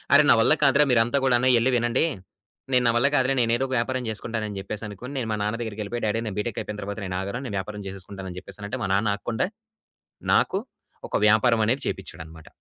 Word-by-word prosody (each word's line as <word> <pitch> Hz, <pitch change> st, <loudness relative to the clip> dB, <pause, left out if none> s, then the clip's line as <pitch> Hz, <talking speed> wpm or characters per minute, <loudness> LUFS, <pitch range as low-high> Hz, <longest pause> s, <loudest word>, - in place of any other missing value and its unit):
అరేయ్, 145 Hz, 0 st, +6 dB
నా -, -, +7 dB
వల్ల 115 Hz, -, +5 dB
కాదురా 140 Hz, +1 st, +5 dB
మీరు 120 Hz, -2 st, +5 dB
అంతా 140 Hz, +4 st, 0 dB
కూడాను 125 Hz, 0 st, +3 dB
ఎళ్లి 125 Hz, +3 st, +2 dB
వినండి. 120 Hz, +6 st, +1 dB, 0.7 s
నేను 125 Hz, -1 st, +4 dB
నా -, -, +5 dB
వల్ల 125 Hz, +4 st, +4 dB
కాదులే, 130 Hz, 0 st, +2 dB
నేను 115 Hz, -1 st, +1 dB
ఎదోక 130 Hz, +1 st, -2 dB
వ్యాపారం 130 Hz, +2 st, -1 dB
జేసుకుంటానని 110 Hz, -1 st, -4 dB
జెప్పేసి 100 Hz, +3 st, -5 dB
అనుకోని 120 Hz, +7 st, -8 dB
నేను 115 Hz, -3 st, -3 dB
మా 105 Hz, -, -1 dB
నాన్న 105 Hz, +2 st, -1 dB
దెగ్గరికెళ్ళిపోయి, 110 Hz, +1 st, -4 dB
డాడీ 105 Hz, +2 st, 0 dB
నేను 105 Hz, -, -4 dB
బీటెక్ 110 Hz, +1 st, -3 dB
అయిపోయిన 105 Hz, -1 st, -6 dB
తరువాత 100 Hz, +2 st, -5 dB
నేనాగను, 95 Hz, +5 st, -3 dB
నేను 115 Hz, -, -5 dB
వ్యాపారం 105 Hz, +2 st, -6 dB
జేసేసుకుంటానని 95 Hz, -1 st, -8 dB
జెప్పేసనంటే, 105 Hz, +6 st, -6 dB
మా 100 Hz, -, 0 dB
నాన్న 105 Hz, +2 st, +1 dB
ఆక్కుండా 115 Hz, +5 st, -2 dB, 0.9 s
నాకు -, -, +3 dB, 0.5 s
ఒక -, -, -3 dB
వ్యాపారం 110 Hz, +2 st, +4 dB
అనేది 130 Hz, +5 st, +1 dB
చేపిచ్చాడన్నమాట. 80 Hz, -4 st, -7 dB
110 Hz, 195 wpm, -25 LUFS, 100-125 Hz, 0.9 s, నా